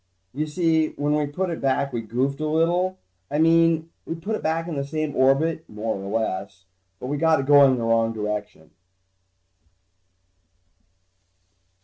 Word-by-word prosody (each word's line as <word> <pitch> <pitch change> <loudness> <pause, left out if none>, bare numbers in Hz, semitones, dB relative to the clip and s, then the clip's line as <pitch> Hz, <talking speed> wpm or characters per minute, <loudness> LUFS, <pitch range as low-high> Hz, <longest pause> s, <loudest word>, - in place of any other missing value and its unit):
You 150 +4 -2
see, 160 -1 +1
when 145 +1 0
we 150 -1 +1
put 180 +5 -3
it 165 - -5
back, 135 0 0
we 120 - -2
goofed 130 +6 -2
a 155 - -1
little. 175 +4 +1 0.3
I 145 - -2
mean, 165 0 +3
we 165 - -4
put 200 +7 -3
it - - -5
back 165 +1 -1
in 165 - -4
the 140 - -2
same 155 0 -3
orbit, 145 +5 +2
more 110 +1 -3
or 100 +3 -2
less, 95 -2 -4 0.3
but - - -7
we 145 +3 -2
got 160 0 +3
it 135 - -2
going 140 -1 +7
in - - -1
the 115 - -3
wrong 115 0 +2
direction. 105 -7 -5
145 Hz, 165 wpm, -24 LUFS, 115-160 Hz, 0.3 s, going